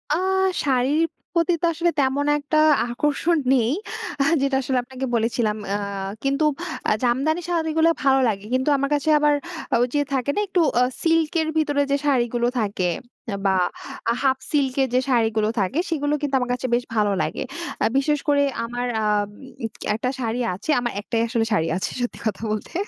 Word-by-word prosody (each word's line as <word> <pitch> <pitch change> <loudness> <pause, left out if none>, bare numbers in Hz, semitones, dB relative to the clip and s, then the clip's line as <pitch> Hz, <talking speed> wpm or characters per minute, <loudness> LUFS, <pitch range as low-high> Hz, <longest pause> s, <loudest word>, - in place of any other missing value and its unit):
আ - - +1 0.5
শাড়ির 275 +3 +2 0.3
প্রতি 340 0 +2
তো - - +2
আসলে 345 +2 +1
তেমন 275 +1 +1
একটা 295 +1 -1 0.3
আকর্ষণ 295 +6 +1 0.2
নেই। 240 -1 +2 0.5
আ - - +5 0.2
যেটা 275 -1 +1
আসলে 260 0 -1
আপনাকে 260 +1 -5
বলেছিলাম। 225 -1 0 0.2
আ - - +1 0.5
কিন্তু 275 +3 +1 0.5
আ - - +3
জামদানি 275 +8 +1
শাড়িগুলা 325 -1 +2
ভালো 270 -1 +4
লাগে। 205 -1 -2
কিন্তু 260 +3 +1
আমার 275 +1 -1
কাছে 290 +2 -1
আবার 295 0 +4 0.5
ঐযে 255 +4 +1
থাকে 265 +1 0
না? - - +1
একটু 375 -2 0 0.2
আ - - +6 0.2
সিল্ক 325 -2 +2
এর 315 - -1
ভেতরে 290 -2 +2
যে, - - +4
শাড়িগুলো 240 -3 +1
থাকে 200 -4 0 0.6
বা 195 - +4 0.7
হাফ 265 -1 +3
সিল্ক 275 -4 +1
এর 265 - +2
যে, 255 - +4
শাড়িগুলো 225 -3 +2
থাকে। 200 - 0
সেগুলো 295 -3 0
কিন্তু 280 -2 -1
আমার 250 -1 -2
কাছে 250 +1 -2
বেশ 245 - +2
ভালো 210 -1 +2
লাগে। - - -2 0.4
অ্যা - - +3
বিশেষ 295 +1 +2
করে 285 -1 +4 0.2
আমার 245 +1 -3 0.2
আম 210 -1 +1 0.7
একটা 250 +3 -1
শাড়ি 230 0 -2
আছে, 195 +11 -9
আমার 240 -1 -2
একটাই 225 +1 -1
আসলে 230 -1 0
শাড়ি 165 -4 +2
আছে - - -2
সত্যি 245 - -3
কথা 215 -1 -2
বলতে। 215 - -4
265 Hz, 175 wpm, -23 LUFS, 230-295 Hz, 0.7 s, আ